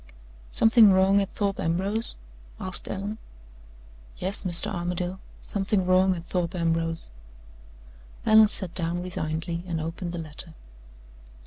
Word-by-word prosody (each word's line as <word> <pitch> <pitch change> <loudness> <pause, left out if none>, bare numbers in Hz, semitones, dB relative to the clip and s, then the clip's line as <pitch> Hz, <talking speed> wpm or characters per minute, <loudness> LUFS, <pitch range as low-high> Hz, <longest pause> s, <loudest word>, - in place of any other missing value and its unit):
"Something 225 - +6
wrong 190 +1 +4
at 195 - -3
Thorpe 200 -2 -1
Ambrose?" 195 +7 -1 0.4
asked 185 -1 -1
Allen. 205 +3 -4 1.0
"Yes, 190 +3 -1
Mr. 175 -3 +2
Armadale; 175 +1 -3 0.2
something 195 -1 -1
wrong 185 +1 +4
at 170 -1 -8
Thorpe 175 0 -2
Ambrose." 165 - -1 1.1
Allan 220 0 +7
sat 190 -4 -1
down 175 0 -2
resignedly, 170 -1 -3
and 165 -2 -2
opened 165 +2 -4
the - - -4
letter. 160 +1 -7
180 Hz, 120 wpm, -26 LUFS, 170-195 Hz, 1.1 s, Allan